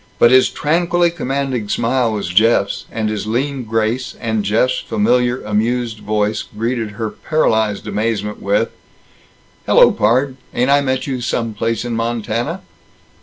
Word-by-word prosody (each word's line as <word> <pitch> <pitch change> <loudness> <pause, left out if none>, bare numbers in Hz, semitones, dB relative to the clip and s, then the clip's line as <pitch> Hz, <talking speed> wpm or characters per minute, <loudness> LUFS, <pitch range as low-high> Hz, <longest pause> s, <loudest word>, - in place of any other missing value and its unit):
But 120 - +5
his 130 0 +6
tranquilly 170 +2 +1
commanding 135 -8 -2
smile 120 0 +1
was 100 -4 -3
Jeff's, 100 0 +2
and 110 -1 -2
his 105 -1 -3
lean 130 +3 -2
grace; 115 +3 -1
and 110 -3 -1
Jeff's 120 +5 +1
familiar 125 - +1
amused 110 +2 -1
voice 105 0 -1
greeted 115 0 -3
her 110 -2 -3
paralyzed 110 -10 0
amazement 105 0 -2
with: 105 +3 +1 1.0
"Hello, - - +6
pard! 130 +5 +1 0.2
Ain't 125 +3 +2
I 145 0 +5
met 130 -1 -1
you 130 -3 -3
some 115 -1 -2
place 115 +2 -2
in 120 -1 -2
Montana?" 115 - -2
115 Hz, 140 wpm, -18 LUFS, 110-130 Hz, 1.0 s, his